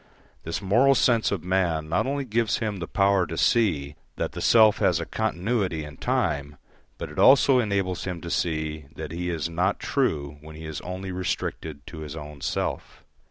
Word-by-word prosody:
This 85 +5 -4
moral 125 +8 +4
sense 120 -3 +3
of 100 -6 -2
man 90 -4 0
not 85 +10 0
only 140 0 -2
gives 115 -2 +1
him 105 -3 -2
the 85 -3 -5
power 100 -2 +2
to 80 - -5
see 80 - +2 0.2
that - - -2
the - - -6
self 110 -2 +5
has 90 -3 +3
a 85 - -3
continuity 100 -5 -1
in 75 0 -10
time, 70 +1 -1 0.4
but - - -6
it - - -6
also 135 -1 +6
enables 100 -5 -1
him 90 -2 -4
to 85 - -6
see 80 -3 -2
that - - -6
he 90 +1 -3
is 85 -2 -2
not 90 +4 0
true 75 - -1
when 80 0 -11
he 80 +1 -9
is 80 -2 -5
only 95 +1 -5
restricted 80 -5 -4
to 80 - -9
his 75 -1 -7
own 75 -2 -9
self. - - -3
90 Hz, 190 wpm, -25 LUFS, 80-105 Hz, 0.4 s, also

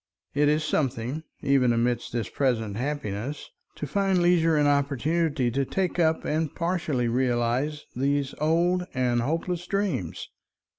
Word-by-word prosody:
It 145 +1 +3
is 150 +1 +2
something, 135 -1 -1 0.2
even 135 -3 +3
amidst 120 0 0
this 115 -4 -2
present 115 -6 0
happiness, 130 0 -4 0.2
to - - -4
find 195 +4 +1
leisure 170 -2 +4
and 145 -1 +3
opportunity 145 0 +1
to 135 +3 +1
take 180 +5 -1
up 160 -1 +2
and 155 -1 -1
partially 165 -8 0
realize 125 +4 0
these 140 +1 0
old 175 +4 +2
and 125 -2 +1
hopeless 165 +6 -2
dreams. 195 - -2
145 Hz, 135 wpm, -26 LUFS, 125-165 Hz, 0.2 s, leisure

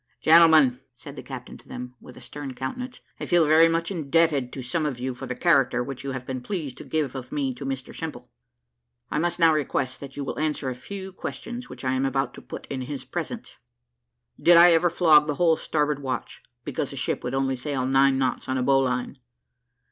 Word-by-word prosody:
"Gentlemen," 160 -6 +6 0.2
said 140 +2 -11
the - - -7
captain 130 -2 -9
to - - -22
them, 125 0 -7
with 125 - -13
a - - -12
stern 135 +2 -8
countenance, 245 - -6 0.2
"I - - -5
feel 175 -2 +4
very 160 +2 +6
much 165 +2 -1
indebted 155 -5 +1
to 130 - -6
some 155 +6 -1
of 145 -5 -2
you 130 +1 -3
for 125 - -8
the 125 - -4
character 135 -7 +3
which 135 0 -7
you 135 -1 -4
have 130 -1 -6
been 130 -1 -4
pleased 150 -5 -5
to - - -7
give 155 -5 -2
of 130 -2 -7
me 140 -3 -1
to 135 +2 -7
Mr 135 -1 -5
Simple. - - -6 0.8
I 150 - 0
must 170 +1 0
now 165 -2 +5
request 130 -3 -1
that 140 -1 -10
you 145 - -3
will 135 - -4
answer 150 -4 -1
a - - -3
few 190 +10 -8
questions 240 +6 -6
which - - -9
I 130 - +1
am 130 +1 +1
about 135 -2 -1
to - - -11
put - - -9
in 135 -2 -5
his 135 +2 -6
presence. 175 +7 -6 0.8
Did 175 0 +7
I 175 +1 +8
ever 170 +1 +4
flog 155 -4 +5
the 150 - -1
whole 165 +1 +4
starboard 150 -2 -1
watch, 130 -2 -4 0.2
because - - -3
the - - -8
ship - - -2
would 125 +1 -3
only 135 0 0
sail 130 0 -3
nine 135 0 +4
knots 130 -1 -1
on 130 - 0
a 125 - 0
bowline!" 130 -1 +1
140 Hz, 220 wpm, -25 LUFS, 130-160 Hz, 0.8 s, I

